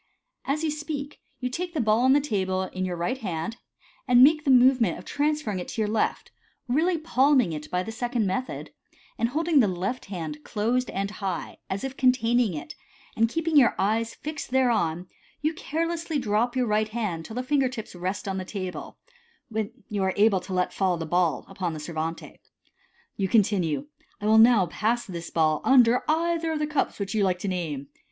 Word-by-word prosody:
As 295 +3 -1
you 315 - +1
speak, 300 -1 -5 0.2
you 250 - -2
take 345 +7 -4
the - - 0
ball 220 -2 +3
on 260 +2 +5
the 290 - +5
table 190 -8 -1
in 185 0 -4
your 180 -1 -3
right 205 +10 -2
hand, 200 +2 -4 0.5
and 250 0 +7
make 305 +2 +5
the - - +1
movement 250 -6 +5
of - - -11
transferring 290 -8 -1
it 180 - -6
to 225 - -3
your 215 - +1
left, 215 +1 -1 0.4
really 325 +8 +2
palming 270 - +3
it 150 0 -6
by 180 0 -1
the 225 - -6
second 240 -1 -1
method, 255 +7 -3 0.5
and 230 - +2
holding 320 +2 +2
the 230 - +5
left 190 +7 -3
hand 160 -6 -6
closed 240 +4 -1
and 200 +1 -3
high, 190 -6 -4
as 195 +1 -3
if 270 0 -5
containing 240 -5 +2
it, 150 0 -7 0.4
and 225 +1 +3
keeping 330 +4 -1
your 270 -5 +6
eyes 225 +3 0
fixed 305 +1 -6
thereon, 220 -10 +1 0.3
you 310 +2 0
carelessly 330 +1 -2
drop 235 0 0
your 255 -1 +2
right 215 0 +1
hand 210 -8 -3
till 220 - -9
the 250 - -2
finger 270 -1 +2
tips 230 -4 -7
rest 185 +3 -4
on 190 -1 -2
the - - -4
table, 185 -1 -6 0.5
when 220 -2 -2 0.2
you 205 -3 -2
are 190 -1 +1
able 205 -2 +4
to 180 - -10
let 180 -1 0
fall 185 -3 +1
the 165 - -4
ball 175 0 +1
upon 185 -3 -3
the 155 - -6
servante. 160 +1 -5 0.8
You 195 - 0
continue, 195 - +2 0.2
" - - -36
I 205 - -6
will 220 +1 +6
now 225 -4 +6
pass 220 +7 -1
this 170 -3 -7
ball 155 -2 +1
under 250 -2 +5
either 330 +1 +1
of - - -1
the 300 - 0
cups 300 -1 -1
which 200 0 -4
you 215 -2 +2
like 185 -2 +1
to 190 - -5
name. 155 -7 -3
220 Hz, 200 wpm, -26 LUFS, 185-265 Hz, 0.8 s, and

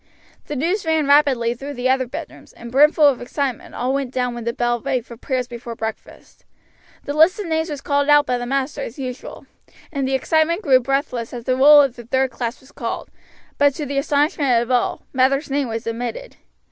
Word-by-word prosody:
The 295 - -4
news 345 +9 -1
ran 320 -2 +1
rapidly 275 -5 +3
through 275 +4 -8
the 245 +1 -1
other 260 -1 +1
bedrooms, - - -9
and 235 - -11
brimful 300 +3 +5
of 270 -4 +1
excitement 260 0 -4
all 250 +2 -1
went 275 -2 -1
down 250 -2 -1
when 240 -1 -7
the 235 - 0
bell 240 -1 -1
rang 265 -3 -1
for 235 - -11
prayers 255 +1 -3
before 235 -1 -8
breakfast. 220 0 -8 0.6
The 285 - -4
list 325 +7 +4
of 415 - -3
names 320 0 -1
was 290 -2 -5
called 285 +1 0
out 295 0 +6
by 250 -1 -1
the 245 - -5
master 275 +2 -2
as 245 - -7
usual, 255 -2 -7 0.5
and 275 -3 -2
the 265 - 0
excitement 320 +7 +1
grew 265 -6 +5
breathless 255 -2 -2
as 240 - -7
the 255 +2 0
roll 290 +3 +8
of 270 -3 -1
the 240 - -10
third 260 +2 0
class 235 0 -4
was 265 +2 -19
called; - - -5 0.5
but 285 -1 +4
to 300 - -4
the 280 0 -1
astonishment 285 -3 +2
of 240 - -6
all, 250 -1 0
Mather's 275 +2 +1
name 280 -1 0
was 225 0 -5
omitted. 245 - -5
265 Hz, 210 wpm, -20 LUFS, 245-290 Hz, 0.6 s, roll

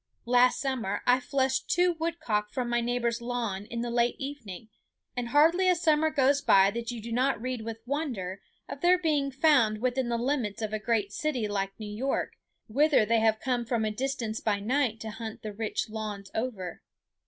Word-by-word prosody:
Last 245 +1 +4
summer 245 -8 -2
I 250 +1 +5
flushed 265 0 0
two 355 0 +3
woodcock 320 -11 -2
from 245 0 -3
my 240 0 +1
neighbor's 235 0 -1
lawn 230 -5 -3
in 235 0 -4
the 240 0 -3
late 240 0 +2
evening; 235 -7 -7 0.5
and 245 -1 -2
hardly 330 +7 +4
a 365 - +5
summer 315 -2 +3
goes 285 -2 +3
by 195 -4 +5
that 235 +2 -4
you 240 -2 -4
do 230 +2 -8
not 255 +1 +1
read 250 0 -3
with 225 0 -7
wonder 240 - -3 0.3
of - - -8
their 360 +1 +5
being 300 -5 +1
found 270 -6 +3
within 250 +1 0
the 235 - 0
limits 235 -4 -1
of 215 0 -3
a 215 - -1
great 210 -2 0
city 300 -9 -1
like 195 -1 -3
New 210 -1 -6
York, 265 +5 -1 0.3
whither 280 0 +3
they 230 +1 +3
have 220 -1 +2
come 250 -2 -1
from 230 -1 -1
a 215 - 0
distance 230 -2 -3
by 205 -2 0
night 235 +1 0
to 220 - -5
hunt 220 0 -7
the 215 -1 -5
rich 220 +1 -2
lawns 215 -3 -6
over. 215 -7 -4
240 Hz, 195 wpm, -28 LUFS, 215-270 Hz, 0.5 s, I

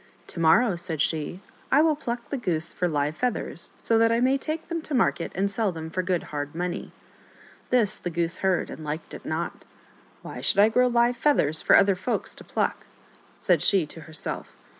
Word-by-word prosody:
" - - -32
To - - -7
morrow," 175 +6 +4
said 170 -2 -3
she, 160 +4 -1
" - - -30
I 295 +3 +5
will 315 -2 +3
pluck 240 -4 -5
the 280 - -1
goose 170 -9 -2
for 180 - 0
live 150 -1 -1
feathers, 250 -2 -2
so 225 -1 +3
that 230 0 +4
I 230 - +2
may 260 +2 +3
take 310 +3 -3
them 335 -1 -3
to 305 -2 -4
market 240 - +1
and 200 +2 0
sell 205 -1 0
them 160 -1 -7
for 185 - -1
good 180 -1 -1
hard 145 +1 -4
money." 180 +2 -4 0.8
This 235 -5 +2
the 175 - -4
goose 170 0 -2
heard, 190 -2 0
and 155 - -8
liked 150 +2 -5
it - - -9
not. 160 +2 -3 0.3
" - - -30
Why - - -7
should - - +1
I 205 +2 +6
grow 250 +3 +3
live 240 0 +2
feathers 160 - +4
for - - +6
other 195 0 +5
folks 190 +7 0
to - - -12
pluck - - -2 0.3
?" - - -29
said - - +1
she 190 -5 +3
to 160 +2 -10
herself. 160 0 -6
190 Hz, 220 wpm, -25 LUFS, 165-240 Hz, 0.8 s, I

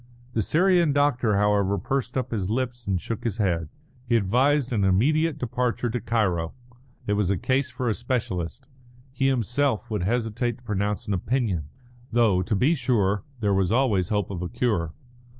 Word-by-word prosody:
The 110 - +1
Syrian 170 - +3
doctor, 125 -7 +2
however, 100 -1 +2
pursed 125 +6 -2
up 125 -2 -2
his 100 -5 -2
lips 120 0 -2
and 95 -2 +1
shook 115 +4 -5
his 115 -3 -2
head. 85 -7 0 0.4
He 120 - +4
advised 125 +6 +2
an 105 -3 +1
immediate 145 - +2
departure 125 -2 -1
to 125 - -1
Cairo. 95 -7 0 0.5
It 105 - 0
was 100 -3 +1
a 100 - +1
case 130 +7 0
for 130 -1 -4
a 110 - +2
specialist. 120 -2 -3 0.4
He 135 +1 0
himself 125 -1 0
would 105 - -1
hesitate 115 +3 -1
to 125 - -23
pronounce 105 0 -2
an 105 - -1
opinion; 100 - -1 0.4
though, 110 -6 +3
to 105 +4 -1
be 130 +11 +3
sure, 105 - +1 0.2
there 100 -2 +2
was 95 -1 +1
always 110 -8 +2
hope 105 -3 -1
of 90 -3 -4
a 90 - -3
cure. 90 -10 0
115 Hz, 175 wpm, -25 LUFS, 100-130 Hz, 0.5 s, He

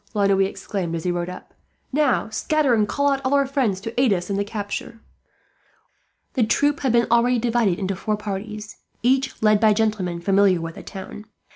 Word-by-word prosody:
La 205 -1 +2
Noue 195 -1 +3
exclaimed, 185 -4 -4
as 165 - -4
he 180 - 0
rode 175 0 -2
up. 180 - -10 0.4
"Now, 290 -3 +2
scatter 285 +4 +1
and 215 -2 +2
call 285 +6 +1
out 275 0 -1
all 260 +2 +2
our 280 0 +3
friends 260 -8 0
to 225 +4 -2
aid 255 -4 +3
us 180 0 -1
in - - 0
the 200 - 0
capture." 205 +1 -5 1.3
The 255 - 0
troop 285 +6 +2
had 265 -3 0
been 235 0 +3
already 240 +1 +4
divided 230 -5 +1
into 195 0 -2
four 210 +3 -2
parties, 210 +1 -6 0.3
each 265 +2 +1
led 215 -1 +5
by 215 -1 +5
gentlemen 205 -5 -1
familiar 195 0 +3
with 165 0 -5
the - - -10
town. 210 +2 -9
215 Hz, 195 wpm, -22 LUFS, 195-245 Hz, 1.3 s, led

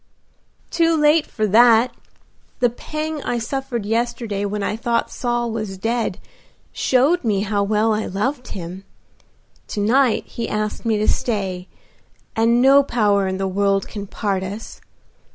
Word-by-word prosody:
"Too 330 -1 +2
late 300 +1 +4
for 215 - -2
that. 230 +3 +5 0.7
The 245 -2 +3
pang 310 +4 -5
I 245 - -2
suffered 240 -1 -3
yesterday 225 -2 -1
when 205 0 -3
I 210 - -1
thought 230 +1 -1
Saul 240 -1 -1
was 215 -4 -4
dead 230 +4 -1 0.5
showed 275 +7 +2
me 205 -4 +1
how 205 0 0
well 215 +2 +2
I 215 0 -2
loved 245 +7 -2
him. 180 +1 -7 0.8
To - - -4
night 240 +4 +2
he 230 -1 -5
asked 215 +2 -3
me 220 -2 +2
to 215 - 0
stay, 190 -5 -1 0.7
and 235 +2 +3
no 275 +1 +7
power 205 -7 +1
in 190 0 -2
the 195 0 -1
world 195 +1 +1
can 205 -2 -7
part 195 -2 -2
us. 200 +4 -7
225 Hz, 150 wpm, -21 LUFS, 200-245 Hz, 0.8 s, no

